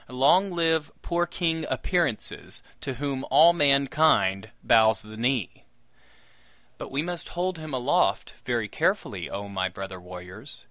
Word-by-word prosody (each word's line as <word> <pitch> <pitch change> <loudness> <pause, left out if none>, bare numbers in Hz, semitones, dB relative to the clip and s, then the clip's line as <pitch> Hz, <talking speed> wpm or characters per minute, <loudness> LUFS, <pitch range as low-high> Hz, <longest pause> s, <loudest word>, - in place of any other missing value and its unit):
Long 140 +10 +3
live 160 -4 +1
poor 175 0 0
King 165 -2 -1
Appearances, 170 - -2 0.2
to 135 - -5
whom 135 0 -3
all 170 +2 +7
mankind 140 - +3
bows 110 -3 +4
the 110 0 -11
knee! 120 -2 -1 1.2
But - - -7
we 140 +3 -1
must 175 0 -5
hold 180 0 -2
him 155 -1 -7
aloft 125 -2 +1
very - - -1
carefully, - - -1
oh, 100 +1 -5
my 95 -1 -2
brother 95 0 -8
warriors! 90 +8 -9
140 Hz, 135 wpm, -26 LUFS, 105-165 Hz, 1.2 s, all